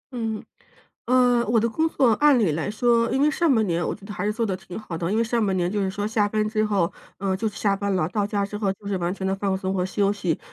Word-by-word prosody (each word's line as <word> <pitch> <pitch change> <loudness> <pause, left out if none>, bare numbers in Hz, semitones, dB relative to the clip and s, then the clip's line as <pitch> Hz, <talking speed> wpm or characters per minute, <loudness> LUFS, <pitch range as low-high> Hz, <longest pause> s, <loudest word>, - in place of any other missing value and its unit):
嗯， 225 -2 -3 0.6
呃， 245 -1 +3
我 225 0 +3
的 230 - +1
工 320 +8 0
作 245 -4 +3
按 290 +2 +4
理 190 -9 +2
来 165 +6 -2
说 230 +1 +2
因 265 - +1
为 300 +1 +4
上 320 -4 +2
半 220 -1 +3
年 170 0 0
我 - - -2
觉 200 - -13
得 210 - -7
还 180 - -3
是 210 - +1
做 230 +1 -1
得 190 -2 -2
挺 185 0 -9
好 200 -6 -6
的， 170 +4 -2
因 220 - +1
为 - - +3
上 230 -1 0
半 195 -2 0
年 175 -1 0
就 205 -1 -1
是 190 - 0
说 205 +1 -3
下 215 -1 +1
班 215 0 0
之 215 0 0
后， 195 -5 +1 0.3
呃， 190 -1 -1
就 220 +3 -2
下 200 -1 0
班 200 -1 -1
了， 175 -3 +1
到 205 +1 -1
家 205 -1 -1
之 210 - -6
后 200 -2 0
就 200 +1 -15
是 195 - -1
完 175 0 -1
全 190 -1 -4
地 190 - +1
放 195 -1 -1
松 190 0 -2
和 180 -1 0
休 200 +1 +1
息。 185 -6 -1
205 Hz, 320 characters per minute, -24 LUFS, 190-225 Hz, 0.6 s, 按